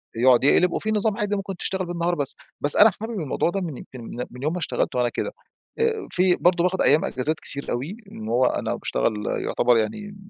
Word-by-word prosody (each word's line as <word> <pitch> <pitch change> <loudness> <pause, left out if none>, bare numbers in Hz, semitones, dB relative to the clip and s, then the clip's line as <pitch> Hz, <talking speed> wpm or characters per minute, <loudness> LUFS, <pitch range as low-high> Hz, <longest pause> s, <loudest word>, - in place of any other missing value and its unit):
يقعد 125 +1 +5
يقلب 175 +5 +4
وفي 220 - -1
نظام 210 -1 +1
عادي 205 0 0
ممكن 195 -2 -4
تشتغل 190 -1 -2
بالنهار، 175 0 -1
بس 145 -3 -1 0.3
بس 145 - 0
أنا 215 +1 +8
حابب 225 -2 -4
الموضوع 155 +1 0
ده، 195 +2 -2
من 160 -7 -4
يمكن 125 -2 -10 0.3
من 125 +2 -9
يوم 155 - +1
ما - - -2
اشتغلت 150 - -1
وأنا 120 -1 +2
كده. - - -4 0.8
في 180 0 +3
برضو 175 -1 +3
باخد 185 +1 +1
أيّام 150 +3 +4
إجازات 145 +5 -1
كتير 140 0 -6
أوي 140 - -3
إن 110 - -7
هو 125 +2 +3
أنا - - 0
باشتغل 105 -2 -1 0.2
يعتبر 120 -1 +3
يعني 205 - -3
170 Hz, 205 wpm, -24 LUFS, 130-195 Hz, 0.8 s, أنا